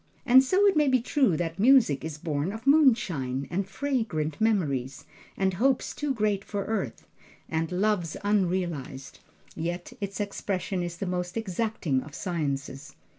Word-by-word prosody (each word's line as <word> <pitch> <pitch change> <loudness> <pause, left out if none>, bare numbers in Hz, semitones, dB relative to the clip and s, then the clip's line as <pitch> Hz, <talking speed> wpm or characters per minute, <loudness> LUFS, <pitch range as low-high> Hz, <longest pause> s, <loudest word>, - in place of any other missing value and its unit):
And 260 +1 +7
so 375 +9 +3
it 400 - +4
may 300 -1 +3
be 260 -1 +4
true 245 - +2
that 165 +1 -3
music 225 - +5
is 155 -1 -5
born 155 +1 -2
of 220 +3 -8
moonshine, 210 - +3
and 190 +2 -2
fragrant 220 - -2
memories, 140 - 0 0.3
and 190 -1 +1
hopes 255 +7 +1
too 295 -1 -2
great 210 -5 0
for 200 -1 -4
earth, 200 - -3 0.4
and 160 +1 -2
loves 180 -3 0
unrealized; 175 -9 -1 0.4
yet 175 +6 -4
its 200 0 -4
expression 195 -2 -2
is 175 -1 -4
the 195 - -3
most 180 +1 -3
exacting 205 - -1
of 145 +1 -11
sciences. 145 -5 -4
190 Hz, 150 wpm, -27 LUFS, 160-225 Hz, 0.4 s, And